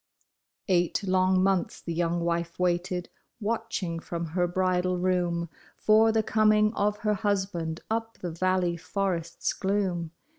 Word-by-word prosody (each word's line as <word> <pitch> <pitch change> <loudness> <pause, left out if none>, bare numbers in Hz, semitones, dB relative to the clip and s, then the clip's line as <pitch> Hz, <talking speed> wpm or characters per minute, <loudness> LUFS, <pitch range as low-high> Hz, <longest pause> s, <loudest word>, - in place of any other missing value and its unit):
Eight 180 +1 +2
long 185 -1 +3
months 190 -2 +1
the 170 - -5
young 170 +1 0
wife 170 0 -1
waited, 180 0 0 0.3
v/atching 215 -6 -2
from 170 0 -4
her 175 -1 +2
bridal 185 0 +1
room 175 -2 0 0.3
For 220 +1 +5
the 220 0 +2
coming 215 0 +3
of 210 -1 0
her 210 - +3
husband 190 -6 -1
up 225 0 -2
the 175 - -5
valley 180 0 +1
forest's 180 -2 -2
gloom. 190 -4 -1
185 Hz, 135 wpm, -27 LUFS, 175-205 Hz, 0.3 s, For